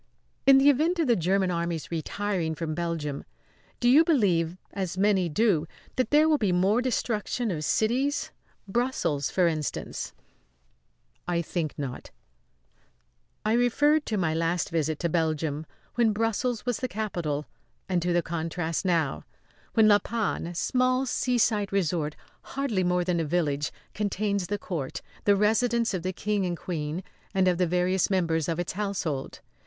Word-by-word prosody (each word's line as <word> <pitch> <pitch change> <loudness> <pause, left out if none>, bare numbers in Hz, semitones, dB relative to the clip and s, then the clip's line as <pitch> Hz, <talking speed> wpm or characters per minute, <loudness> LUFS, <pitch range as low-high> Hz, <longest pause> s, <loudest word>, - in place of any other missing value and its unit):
"In 275 -1 +9
the 280 +2 +7
event 320 +6 +1
of 330 - +2
the 240 -3 +4
German 185 +1 +1
Army's 170 -2 -2
retiring 170 0 -2
from 155 0 -3
Belgium, 160 -4 -3 0.6
do 240 - +2
you 280 +6 +7
believe, 185 - +2 0.2
as 185 -3 -3
many 190 -3 +3
do, 170 -2 +2 0.3
that 255 - 0
there 300 +2 +5
will 305 -2 +3
be 205 -4 +1
more 190 +6 +3
destruction 240 -2 -1
of 155 -3 -3
cities? 255 - +1 0.4
Brussels, 195 - 0
for 185 - +2
instance?" 155 -3 -3 1.1
"I 170 -1 0
think 160 -2 -3
not." 135 -4 -5 1.4
I 215 - +2
referred 290 +6 +3
to 215 - -1
my 165 -4 +1
last 165 +1 0
visit 160 -2 0
to 170 - +1
Belgium, 155 -2 -1 0.3
when 230 -3 +3
Brussels 225 +2 -1
was 245 -3 0
the 255 - -2
capital; 175 - -3 0.4
and 180 -2 +1
to 175 +1 0
the 175 0 +2
contrast 165 0 -2
now, 165 - 0 0.5
when 220 -1 +6
La 205 -1 +6
Panne 215 -4 -2
a 175 - -7
small 255 +6 +1
seaside 230 -5 +1
resort 165 -5 0 0.3
hardly 260 -9 -1
more 180 0 +2
than 175 -1 0
a - - +1
village, 150 -3 0 0.2
contains 200 -2 -1
the 205 +3 -1
court, 165 -5 -5 0.2
the 205 - +5
residence 230 +2 +2
of 185 - -2
the 185 +2 -2
King 205 +1 -1
and 175 -2 -2
Queen, 160 0 -4 0.3
and 190 -1 +3
of 180 -1 +2
the 180 - +3
various 180 +2 +1
members 165 -4 +1
of 165 - -1
his 175 0 -2
household. 185 -9 -3
185 Hz, 160 wpm, -27 LUFS, 165-225 Hz, 1.4 s, In